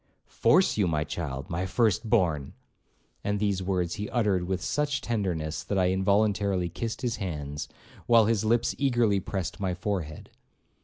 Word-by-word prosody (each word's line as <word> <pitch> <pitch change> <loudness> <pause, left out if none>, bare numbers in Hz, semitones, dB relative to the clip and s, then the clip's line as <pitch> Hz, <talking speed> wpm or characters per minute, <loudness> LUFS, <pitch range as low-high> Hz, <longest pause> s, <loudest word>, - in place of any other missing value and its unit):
'Force 185 -5 +3
you, 100 -4 +3
my 75 -2 0
child, 70 -4 -5
my 90 +3 -2
firstborn!' 95 - +1 0.7
And 105 0 -1
these 100 -2 0
words 90 -2 -1
he 105 - -3
uttered 100 -7 +1
with 95 0 -1
such 145 +7 -1
tenderness, 90 -9 -2
that 100 - -2
I 90 -1 +3
involuntarily 100 -1 +1
kissed 115 +9 -5
his 120 -2 -1
hands, 75 -5 -5 0.4
while 115 -2 +6
his 110 -1 +1
lips 115 +2 +2
eagerly 120 -7 +2
pressed 95 -2 -4
my 95 -3 -1
forehead. 90 -5 -4
95 Hz, 150 wpm, -27 LUFS, 85-110 Hz, 0.7 s, while